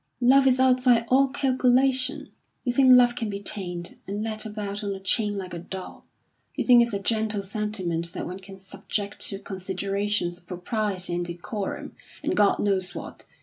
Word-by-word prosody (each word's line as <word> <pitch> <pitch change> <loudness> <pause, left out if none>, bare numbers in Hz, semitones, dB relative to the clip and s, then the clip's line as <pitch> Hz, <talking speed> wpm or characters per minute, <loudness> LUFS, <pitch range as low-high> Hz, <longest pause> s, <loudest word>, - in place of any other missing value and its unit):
Love 265 +2 +5
is 260 0 +3
outside 250 -2 +4
all 270 +2 +5
calculation. 260 0 +1 0.3
You 245 - -1
think 260 0 +5
love 245 -1 +7
can 225 -3 -3
be 200 -1 -4
tamed, 180 -4 -5
and 205 +2 -3
led 220 -1 -4
about 210 -1 -5
on 200 -1 -2
a - - -8
chain 205 +2 +1
like 185 -2 -6
a 170 - -4
dog. 185 +2 -8 0.5
You - - -2
think 245 -2 +7
it's 235 -3 0
a - - -1
gentle 215 -1 0
sentiment 190 -5 -3
that - - -4
one 180 +2 -6
can 195 0 -12
subject 200 +1 -5
to 195 - -3
considerations 195 -1 -2
of 175 - -31
propriety 185 0 -3
and 175 0 -1
decorum, 175 +4 -5 0.3
and - - 0
God 205 -1 +4
knows 190 -3 -1
what. - - -9
205 Hz, 180 wpm, -25 LUFS, 190-240 Hz, 0.5 s, love